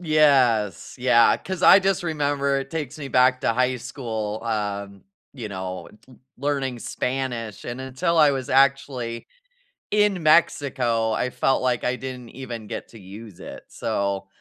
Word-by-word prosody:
Yes. 135 - +2
Yeah, 120 -2 +5
'cause 185 -1 -6
I, 190 - +9
just, 195 -2 0
remember 145 -4 0
it 135 0 -6
takes 155 -3 -5
me 140 -2 -6
back 125 0 +3
to - - +2
high 125 +2 +1
school, 110 -4 -5
um, 100 -3 -4 0.3
you 120 -6 -7
know, 95 -2 -6 0.5
learning 135 -2 -2
Spanish, 125 -5 -4
and 120 +2 -5
until 130 +6 -1
I 150 -2 +6
was 130 -2 -4
actually 135 -3 +1 0.6
in 205 -4 +2
Mexico, 130 -8 +2
I 125 +3 -1
felt 135 +1 +1
like 125 -3 0
I 125 +1 0
didn't 125 -2 -8
even 120 -4 -7
get - - -6
to 115 - -14
use 100 +1 -11
it, - - -9
so, 100 -1 -2
125 Hz, 150 wpm, -23 LUFS, 115-140 Hz, 0.6 s, I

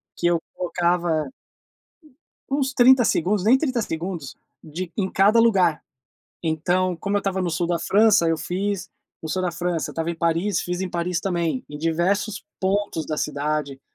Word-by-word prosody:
que 175 - 0
eu 170 -1 +2 0.2
tocava 175 -4 0 1.2
uns 270 -1 0
30 255 0 +6
segundos, 185 +3 +1
nem 250 +4 +6
30 260 -5 -1
segundos, 165 -5 -5 0.3
de 170 +3 -6
em 190 -3 -1
cada 205 +4 +4
lugar. 190 -9 +3 0.6
Então, 175 +3 0
como 200 +3 -2
eu - - +4
estava 190 -1 -2
no 175 - -1
sul 170 +1 -1
da 170 -1 0
França, 205 -1 +4
eu 165 - +2
fiz 195 +3 -2 0.3
o 160 - -5
sul 185 +3 -1
da 180 - 0
França, 175 -1 -2
estava 165 +1 -2
em - - -3
Paris, 170 +3 0
fiz 180 +1 -3
em 190 - -2
Paris 175 0 -1
também, 170 -7 -1
em 145 0 -8
diversos 185 +6 0 0.2
pontos 195 -4 -1
da 155 - -3
cidade. 145 -2 -2
175 Hz, 170 wpm, -23 LUFS, 165-200 Hz, 1.2 s, 30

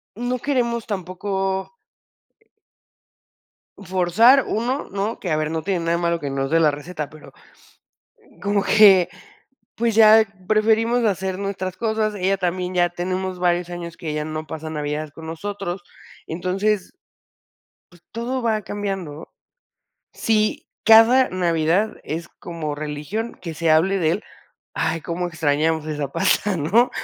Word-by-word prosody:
no 245 +3 -2
queremos 235 -4 -1
tampoco 190 - -3 2.0
forzar, 200 +8 +4
1, 245 +6 -2
¿no? 200 +3 -2
Que 180 - -4
a 155 - +2
ver, 155 0 -1
no 160 0 -2
tiene 190 -1 -1
nada 165 0 0
de 170 - +1
malo 170 0 0
que 145 - -4
nos 135 0 -2
dé 165 +1 +3
la 155 -2 +5
receta, 150 +1 -6
pero, 155 0 -14 1.1
como 200 0 +1
que, 195 -5 +6 0.7
pues, 230 -1 0
ya 220 0 +7 0.2
preferimos 225 +3 +2
hacer 190 -2 -1
nuestras 190 -2 -4
cosas. 220 -1 0
Ella 195 0 +1
también 180 0 -2
ya 175 -1 +3
tenemos 185 +1 -3
varios 175 0 +1
años 170 -1 -7
que 165 -4 -4
ya 150 0 -2
no 155 0 -5
pasa 160 0 -6
navidades 150 0 -3
con 160 +2 -10
nosotros. 185 +1 -5 0.4
Entonces 185 +4 -1 1.0
pues, 175 -1 -20
todo 240 +3 -3
va 220 -3 0
cambiando. 195 -7 -5 0.8
Sí, 215 -1 0 0.2
cada 225 +4 +7
Navidad 175 +3 0
es 160 +2 -5
como 165 -4 -5
religión 150 +10 -4
que 170 -2 -5
se 160 +1 0
hable 180 +5 +3
de 160 -3 +2
él, 205 - -3 0.5
¡ay, 160 0 -1
cómo 175 +2 -3
extrañamos 160 0 0
esa 150 -2 -3
pasta!, 190 +3 +1
¿no? 195 +11 +3
185 Hz, 140 wpm, -22 LUFS, 160-215 Hz, 2.0 s, ya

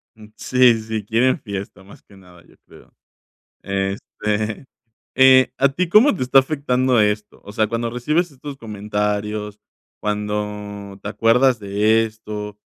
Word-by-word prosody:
Mm, 110 -1 -14
sí, 125 -3 +3
sí. 110 -2 -5
Quieren 125 +8 +1
fiesta 100 -2 -7
más 100 - -16
que 100 - -21
nada, 90 -2 -18
yo - - -23
creo. - - -18 0.7
Este, 105 +4 -3 0.5
eh, 130 -1 +6
¿a 140 0 +3
ti 170 +5 -2
cómo 215 +5 +5
te 130 - -2
está 135 +2 +5
afectando 130 -3 0
esto? 105 0 -2
O 105 - -10
sea, 110 +1 0
cuando 115 +1 -2
recibes 150 +8 -1
estos 140 +1 -9
comentarios, 105 -1 -3 0.4
cuando 105 -1 -4
te - - -5
acuerdas 120 +1 +3
de 105 +3 +2
esto 105 -1 -8
110 Hz, 140 wpm, -20 LUFS, 105-130 Hz, 0.7 s, eh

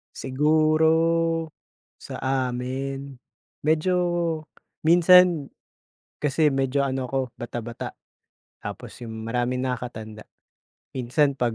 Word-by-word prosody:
Siguro, 160 +3 +2 0.5
sa - - -8
amin, 135 +1 -2 0.5
medyo 160 +4 +2 0.9
minsan 175 -2 +6 0.7
kasi 150 +1 +2
medyo 135 +1 +1
ano 130 -2 -2
ko 135 +2 -1 0.2
bata-bata, 120 -1 -6 0.7
tapos - - -8
yung, 110 -1 -6
maraming 125 +2 -1
nakakatanda. 110 -4 -5 0.7
Minsan 135 +3 +1
pag 120 -2 +1
135 Hz, 85 wpm, -25 LUFS, 125-155 Hz, 0.9 s, minsan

